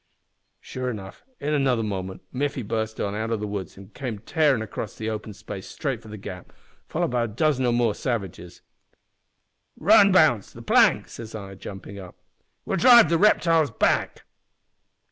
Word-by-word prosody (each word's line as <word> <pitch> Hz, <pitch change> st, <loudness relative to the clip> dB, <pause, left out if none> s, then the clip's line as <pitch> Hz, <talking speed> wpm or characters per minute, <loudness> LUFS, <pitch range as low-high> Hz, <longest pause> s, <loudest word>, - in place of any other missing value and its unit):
Sure 130 Hz, -1 st, -5 dB
enough, 100 Hz, -5 st, -8 dB, 0.2 s
in 150 Hz, +2 st, -2 dB
another 130 Hz, -5 st, +1 dB
moment 95 Hz, -3 st, -5 dB
Miffy 140 Hz, -1 st, -2 dB
burst 110 Hz, 0 st, -3 dB
out 100 Hz, -, -2 dB
o' 110 Hz, +2 st, -2 dB
the 105 Hz, -, -4 dB
woods 100 Hz, -3 st, -6 dB
an' 100 Hz, 0 st, -12 dB
came 125 Hz, -5 st, -5 dB
tearin' 135 Hz, +1 st, +1 dB
across 110 Hz, 0 st, -6 dB
the 110 Hz, 0 st, -4 dB
open 110 Hz, 0 st, -5 dB
space 100 Hz, -, -9 dB
straight -, -, -4 dB
for -, -, -15 dB
the 105 Hz, 0 st, -8 dB
gap, 90 Hz, -2 st, -9 dB, 0.4 s
followed -, -, -1 dB
by 120 Hz, -1 st, +1 dB
a -, -, -3 dB
dozen 130 Hz, +3 st, +1 dB
or -, -, +2 dB
more 120 Hz, -2 st, +2 dB
savages. 95 Hz, -8 st, -5 dB, 1.2 s
"`Run, 200 Hz, -1 st, +6 dB
Bounce 155 Hz, -, +3 dB
the -, -, -11 dB
plank!' -, -, +4 dB
says 115 Hz, -1 st, -9 dB
I, 100 Hz, -2 st, -7 dB
jumpin' 95 Hz, +1 st, -9 dB
up. 90 Hz, -2 st, -11 dB, 0.5 s
`We'll 190 Hz, -, -1 dB
drive 240 Hz, +3 st, +8 dB
the 165 Hz, -1 st, +2 dB
reptiles 165 Hz, -7 st, +4 dB
back!' 115 Hz, -, 0 dB
115 Hz, 165 wpm, -24 LUFS, 100-140 Hz, 1.2 s, drive